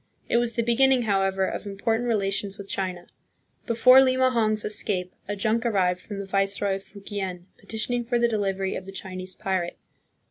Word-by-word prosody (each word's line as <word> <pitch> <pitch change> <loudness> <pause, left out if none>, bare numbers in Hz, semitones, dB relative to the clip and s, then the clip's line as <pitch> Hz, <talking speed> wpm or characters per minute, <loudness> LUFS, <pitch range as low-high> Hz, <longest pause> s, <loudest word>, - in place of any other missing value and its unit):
It - - +2
was 235 -1 +2
the 235 - +1
beginning, 250 +2 +3
however, 195 -2 +1
of 205 - -4
important 225 +4 -1
relations 200 -2 0
with 200 - -9
China. 185 -3 -3 0.6
Before 255 +2 +7
Limahong's 255 -5 +2
escape 185 -3 -1
a 205 - -2
junk 220 +3 0
arrived 185 -6 +1
from 205 - -7
the 200 - -4
viceroy 195 0 0
of 195 - -13
Fukien, 195 -3 -6
petitioning 225 +4 -2
for 240 +1 0
the 235 0 +3
delivery 195 -4 -1
of 190 - -6
the - - -7
Chinese 185 -1 -6
pirate. 185 -3 -2
200 Hz, 170 wpm, -25 LUFS, 195-230 Hz, 0.6 s, Before